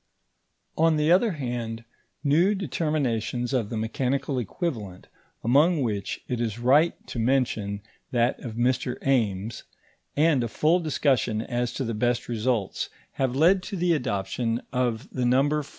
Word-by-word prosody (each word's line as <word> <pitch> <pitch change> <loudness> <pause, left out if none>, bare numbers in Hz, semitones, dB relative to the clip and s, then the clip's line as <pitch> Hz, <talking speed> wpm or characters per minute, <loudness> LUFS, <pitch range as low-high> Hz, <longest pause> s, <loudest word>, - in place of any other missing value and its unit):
On 165 0 +4
the 150 +2 +2
other 195 +3 +4
hand, 120 -5 -4 0.4
new 170 +8 +3
determinations 135 - -1
of 115 -6 0
the 115 - -3
mechanical 130 +4 -1
equivalent, 110 - -4 0.3
among 145 +6 +4
which 105 -4 -3
it 125 -2 -2
is 115 -2 -2
right 140 +8 +4
to 120 - -6
mention 110 -5 0 0.3
that 120 0 +1
of 115 -3 -7
Mr. 125 +1 0
Ames, 110 -5 0 0.6
and 150 -4 +4
a - - -1
full 155 +9 +2
discussion 135 -8 +1
as 120 0 -2
to 135 - -2
the 115 -2 -2
best 120 +2 0
results, 115 -3 -1 0.3
have 130 -1 +1
led 175 +7 +4
to 200 - -6
the 175 0 +2
adoption 115 -3 -1
of 125 -1 -1
the 130 - -2
number 135 +5 +3
4. 145 - -12
125 Hz, 150 wpm, -26 LUFS, 115-150 Hz, 0.6 s, On